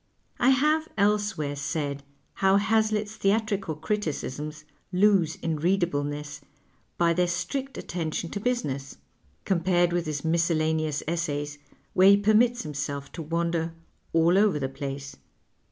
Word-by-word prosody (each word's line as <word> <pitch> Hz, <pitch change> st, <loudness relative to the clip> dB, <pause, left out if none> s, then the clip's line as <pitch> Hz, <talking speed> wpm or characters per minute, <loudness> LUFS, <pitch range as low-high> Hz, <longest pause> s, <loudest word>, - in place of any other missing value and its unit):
I 250 Hz, -, +4 dB
have 305 Hz, +4 st, +3 dB
elsewhere 205 Hz, -8 st, +1 dB
said 145 Hz, -1 st, -3 dB, 0.3 s
how 195 Hz, 0 st, +3 dB
Hazlitt's 215 Hz, +1 st, +1 dB
theatrical 200 Hz, -4 st, 0 dB
criticisms 155 Hz, -4 st, -3 dB, 0.3 s
lose 190 Hz, -3 st, +3 dB
in 160 Hz, -2 st, -3 dB
readableness 150 Hz, -5 st, -1 dB, 0.6 s
by 170 Hz, -1 st, +3 dB
their 180 Hz, +1 st, +2 dB
strict 265 Hz, +11 st, -3 dB
attention 165 Hz, -1 st, -3 dB
to 205 Hz, -, -3 dB
business, 150 Hz, -, -2 dB, 0.5 s
compared 175 Hz, -1 st, +2 dB
with 175 Hz, -2 st, -1 dB
his 150 Hz, 0 st, -3 dB
miscellaneous 160 Hz, -2 st, +1 dB
essays, 150 Hz, -3 st, -2 dB, 0.3 s
where 190 Hz, +1 st, +6 dB
he 200 Hz, -, +7 dB
permits 220 Hz, +4 st, +3 dB
himself 140 Hz, -2 st, -4 dB
to 170 Hz, -, -7 dB
wander 165 Hz, +1 st, -1 dB, 0.2 s
" -, -, -40 dB
all 165 Hz, +3 st, +4 dB
over 205 Hz, -6 st, +3 dB
the 135 Hz, -2 st, -2 dB
place." 140 Hz, 0 st, -6 dB
170 Hz, 125 wpm, -26 LUFS, 150-205 Hz, 0.6 s, he